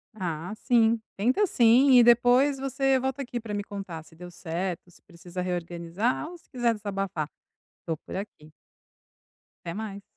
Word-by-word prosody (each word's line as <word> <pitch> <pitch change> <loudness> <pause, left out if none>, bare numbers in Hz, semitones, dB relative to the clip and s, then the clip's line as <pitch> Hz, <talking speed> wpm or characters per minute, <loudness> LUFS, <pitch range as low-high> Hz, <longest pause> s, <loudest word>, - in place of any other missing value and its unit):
Ah, 175 -1 -4
sim, 230 0 +3 0.2
tenta 255 - +2
sim, 250 +1 +5
e 240 - +8
depois 245 +4 +5
você 270 0 +1
volta 265 +2 -2
aqui 240 -1 -4
pra 225 -2 -8
me 205 0 -2
contar 195 -6 -7
se 160 - -19
deu 175 +2 -10
certo, 175 +1 -4
se - - -21
precisa 175 0 -8
reorganizar 175 - -2
ou 350 - -10
se - - -28
quiser 240 -3 +1
desabafar, 195 -6 -3 0.6
tô 165 -2 -2
por - - -10
aqui. 185 -6 -8 1.1
Até 170 - -4
mais. 205 -2 -6
205 Hz, 160 wpm, -27 LUFS, 175-245 Hz, 1.1 s, e